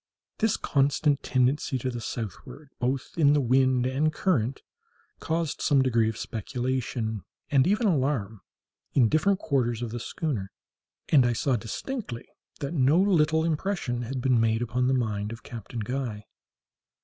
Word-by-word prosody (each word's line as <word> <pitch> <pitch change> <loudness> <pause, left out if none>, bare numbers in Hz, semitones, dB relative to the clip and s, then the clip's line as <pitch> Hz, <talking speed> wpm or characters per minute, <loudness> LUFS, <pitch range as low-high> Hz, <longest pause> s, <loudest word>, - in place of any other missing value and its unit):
This 220 -2 +2
constant 140 0 +1
tendency 130 +2 +1
to 130 +1 -3
the 120 -1 -5
southward, 115 - -7
both 130 +2 -1
in 145 -3 +5
the 150 - +3
wind 130 -1 +3
and 140 +4 +1
current, 135 - 0 0.6
caused 165 -1 -2
some 140 -3 +4
degree 115 -4 +2
of 110 - -5
speculation, 120 -1 -3 0.3
and 140 +1 +4
even 210 +4 +2
of 195 - +4
alarm, 125 - -1 0.5
in 120 -5 +5
different 190 - +2
quarters 125 - 0
of 115 - -4
the 120 - -4
schooner, 115 - -3 0.6
and 140 -5 +6
I 120 0 +2
saw 130 +3 +1
distinctly 120 - -5 0.3
that 140 +3 -3
no 145 +2 +4
little 160 -5 +3
impression 160 -6 -1
had 125 +2 -4
been 125 -2 +3
made 115 +1 +2
upon 125 +1 0
the 130 - +3
mind 105 -4 -1
of 115 0 -9
Captain 115 0 -7
Guy. 115 -2 -4
130 Hz, 155 wpm, -27 LUFS, 120-150 Hz, 0.6 s, and